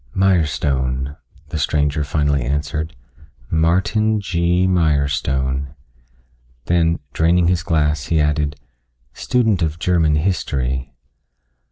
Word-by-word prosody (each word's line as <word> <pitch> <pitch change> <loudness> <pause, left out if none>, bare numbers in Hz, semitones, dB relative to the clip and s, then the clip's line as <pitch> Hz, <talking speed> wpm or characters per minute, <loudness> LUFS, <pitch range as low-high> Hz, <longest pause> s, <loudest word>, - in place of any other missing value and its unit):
"Mirestone," 70 -7 0 0.3
the 80 - -3
stranger 75 +1 0
finally 70 -1 0
answered, 75 +4 -2 0.6
"Martin 95 +7 +2
G. 90 -1 +1
Mirestone." 70 -5 0 0.9
Then, 85 -1 +2 0.2
draining 85 +2 +3
his 90 -3 +1
glass, 75 -2 0
he 80 -1 +1
added, 75 -1 0 0.6
"Student 110 - +1
of 80 -1 -1
German 85 -3 +2
history." 70 -6 -1
75 Hz, 90 wpm, -19 LUFS, 70-85 Hz, 0.9 s, draining